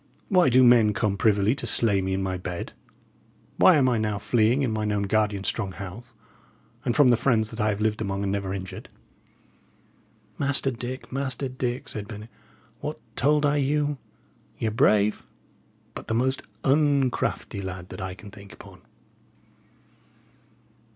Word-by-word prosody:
Why 180 - +4
do 130 +1 +5
men 120 -4 +6
come 100 0 0
privily 100 +1 +2
to - - -5
slay 105 -4 +2
me 95 0 -1
in 95 - -2
my 95 -1 -2
bed? 90 -1 -6 0.8
Why 185 - +7
am 135 -4 +3
I 120 -3 +2
now 105 -1 -1
fleeing 120 +5 +2
in 125 - 0
mine 110 -1 -1
own 100 -1 0
guardian's 105 -1 0
strong 100 -5 -2
house, 115 +7 -9 0.7
and 120 - -1
from 145 -4 +6
the 120 - +6
friends 115 -2 +1
that 115 - -4
I 105 - +2
have 105 -1 -2
lived 110 0 0
among 100 -1 -2
and 100 - -1
never 100 -1 -2
injured?" 95 -1 -7 1.5
"Master 140 -1 +1
Dick, 125 +2 -7
Master 135 0 -2
Dick," 125 0 -3
said 105 -1 -6
Bennet, 105 +2 -9 0.5
"what - - -5 0.2
told 150 +2 +3
I 145 0 +2
you? 145 0 0 0.6
Y' - - -3
are 110 - +1
brave, 105 -1 +2 0.7
but - - -9
the 110 - -1
most 130 +3 +1 0.2
uncrafty 135 -7 +1
lad 90 -1 -7
that - - -8
I 95 -1 -5
can 100 +1 -12
think 100 -1 -13
upon!" - - -14
110 Hz, 165 wpm, -25 LUFS, 100-130 Hz, 1.5 s, Why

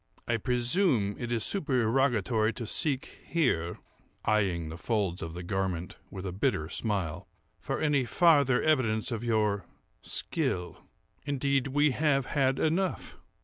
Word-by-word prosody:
"I 120 - +1
presume 125 - +1
it 120 -1 -4
is 115 -2 +1
supererogatory 120 - +2
to 120 - -5
seek 135 +3 -1
here 125 - 0 0.5
(eyeing 95 -7 +1
the 80 - -7
folds 100 -4 -1
of 80 +1 -6
the 90 - -6
garment 90 -2 -3
with 95 -1 -7
a 95 - -3
bitter 95 - -1
smile) 95 -6 -2 0.3
for - - -3
any 145 -4 +2
farther 140 - +4
evidence 120 -8 +1
of 115 -1 -3
your 105 -5 0 0.3
skill. 90 -1 -2 0.5
Indeed, 140 -1 +1
we 145 +2 +3
have 140 -1 +1
had 135 -1 +1
enough. 180 +4 -1
120 Hz, 135 wpm, -29 LUFS, 100-140 Hz, 0.5 s, farther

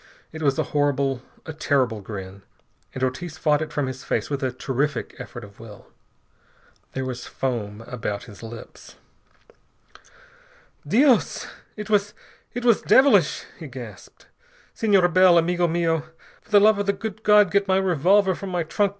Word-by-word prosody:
It 160 - -8
was 140 -3 +1
a - - +1
horrible, 140 -3 +1 0.2
a 160 - -6
terrible 130 -7 0
grin, 95 -1 -8 0.5
and 130 - -3
Ortiz 160 +6 -3
fought 150 -2 +2
it 155 - -4
from 145 - -1
his 130 0 -6
face - - -2
with 140 - -2
a 130 -1 -1
terrific 135 +3 -2
effort 120 -1 -8
of 100 -1 -14
will. 105 -3 -13 1.0
There 130 0 -3
was 125 -1 -6
foam 110 -5 -4
about 115 -3 -5
his 105 -4 -13
lips. 115 0 -11 1.9
"Dios! 250 - +3 0.3
It 210 -1 -7
was 205 0 +1 0.4
it 245 0 -4
was 235 -3 +4
devilish!" 270 +1 +4 0.2
he - - -7
gasped. - - -11 0.5
"Senor 200 -5 +3
Bell, 180 0 +5
amigo 175 +1 +2
mio, 165 -2 0 0.4
for - - -28
the 205 - +6
love 210 0 +5
of 205 - -2
the 200 - +3
good 220 +1 -6
God 210 -3 +5
get 200 0 +2
my 190 0 +3
revolver 190 +2 +3
from 195 +2 -7
my 175 -2 -1
trunk. 200 +5 0
160 Hz, 160 wpm, -23 LUFS, 130-195 Hz, 1.9 s, the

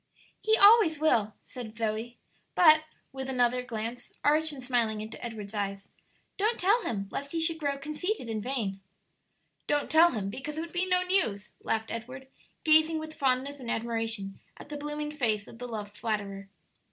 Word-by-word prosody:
"He 440 0 +3
always 405 -6 +7
will," 225 -9 +2
said 230 -3 -9
Zoe; 225 +2 -2 0.4
"but," 310 -2 +7 0.3
with 265 0 -5
another 250 -1 +2
glance, 235 0 -5
arch 310 +2 +3
and 270 -3 -8
smiling, 235 -4 +1
into 215 +3 -8
Edward's 220 -3 -6
eyes, 200 -1 -4 0.5
"don't 435 +4 +1
tell 410 +6 +4
him, 200 - -3
lest 280 +2 -5
he 330 - 0
should 325 0 +1
grow 285 -2 -1
conceited 305 - -3
and 220 -2 -3
vain." 210 -6 -2 0.9
"Don't 290 0 0
tell 330 +2 +7
him, 200 -4 -3
because 295 +6 -6
it - - -1
would 335 0 -8
be 365 +1 +1
no 360 0 +3
news," 325 - 0
laughed 220 0 -1
Edward, 255 +4 -6 0.4
gazing 315 +1 +5
with 315 0 -6
fondness 275 0 0
and 245 -3 -7
admiration 225 -4 -2 0.2
at - - -12
the 295 - -5
blooming 295 +1 -4
face 220 -8 0
of 230 - -13
the 245 - -5
loved 210 -3 -6
flatterer. 200 -3 -3
255 Hz, 175 wpm, -29 LUFS, 220-310 Hz, 0.9 s, always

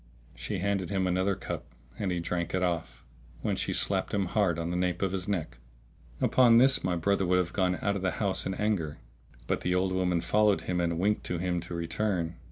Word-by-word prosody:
She 95 - -4
handed 95 -1 -1
him 95 -2 0
another 95 +2 +1
cup 95 - -5 0.4
and 95 -3 -1
he 90 - -1
drank 85 +1 -2
it 95 - 0
off, 85 -3 -2 0.4
when - - 0
she - - -2
slapped - - 0
him 100 -1 +1
hard 95 -3 +1
on 85 +1 -2
the - - -2
nape 90 0 0
of 95 - +1
his 95 -2 -3
neck.[FN#644] - - -6
Upon 120 -3 +6
this 135 +3 +5
my 90 -1 0
brother 100 +3 +1
would 90 +1 +3
have 90 -2 0
gone 90 -2 +1
out 100 -1 +1
of 100 - -3
the 95 - +1
house 100 -3 +1
in 95 - -2
anger; 100 -9 -1 0.5
but - - -1
the 90 +1 0
old 95 +1 +1
woman 90 -2 +1
followed 105 +3 +2
him 90 -1 -1
and 85 -1 0
winked 105 +4 +1
to 90 - -2
him 90 0 -1
to 85 0 -6
return. 85 0 -2
90 Hz, 220 wpm, -29 LUFS, 85-100 Hz, 0.5 s, Upon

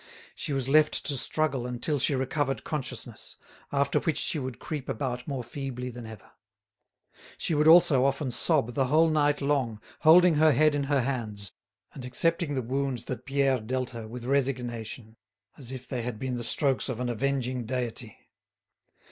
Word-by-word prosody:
She - - -5
was 135 -2 -1
left 150 +2 +3
to 145 - +2
struggle 135 -2 +1
until 125 +4 -1
she 140 - +1
recovered 135 -1 -1
consciousness, 150 -4 -4 0.3
after 140 0 +1
which 160 -4 -1
she 155 - +1
would 130 -3 -5
creep 150 -4 -6
about 125 -3 -3
more 135 -4 -3
feebly 125 0 -5
than 120 -1 -9
ever. 110 -2 -12 1.1
She - - -1
would 150 +1 +3
also 160 -5 +6
often 135 -1 0
sob 125 -1 +1
the 135 +1 +1
whole 160 +4 +4
night 145 -1 +2
long, 135 -6 0 0.2
holding 170 0 +6
her 155 0 +5
head 155 +1 +4
in 145 -1 -1
her 140 -1 +2
hands, 110 -7 -2 0.4
and 130 - -9
accepting 160 +4 +1
the 130 - -1
wounds 135 +1 -2
that 130 - -6
Pierre 135 -1 +2
dealt 125 +3 -3
her 115 -2 -7
with 120 +1 -8
resignation, 120 -4 -2 0.4
as 130 -3 -8
if 130 -1 -8
they 125 -2 -3
had 115 -1 -4
been 130 +3 -3
the 120 -1 -1
strokes 135 +3 +3
of 125 -3 -4
an 125 - -2
avenging 125 0 -1
deity. 120 -3 -4
130 Hz, 175 wpm, -27 LUFS, 125-145 Hz, 1.1 s, also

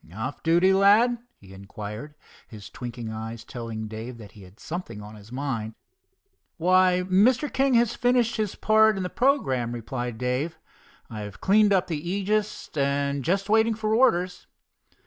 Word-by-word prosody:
"Off 110 +6 -5
duty, 175 +4 +4
lad?" 210 +5 +4 0.2
he 95 -1 -16
inquired, 105 +8 -8 0.3
his 105 -2 -11
twinkling 120 -1 -6
eyes 110 +1 -6
telling 115 -3 -6
Dave 110 +3 -7
that 105 -4 -12
he 105 - -15
had 95 +3 -16
something 170 - -6
on 105 +1 -10
his 105 +1 -14
mind. 125 -5 -4 0.8
"Why, 180 +1 +3
Mr. 225 +10 +3
King 270 -1 +2
has 235 -1 +3
finished 245 -2 +1
his 215 -3 -2
part 220 -1 +4
in 190 - -2
the 180 - -4
programme," 135 - +1
replied 120 0 -5
Dave. 125 +7 -2 0.5
"I've 105 -2 -8
cleaned 210 +1 +4
up 190 -2 +3
the 160 -4 -4
Aegis, 210 +1 -2
and 140 -1 0
just 195 +5 0
waiting 220 +1 +3
for 215 0 -1
orders." 185 -7 +2
160 Hz, 155 wpm, -25 LUFS, -, 0.8 s, duty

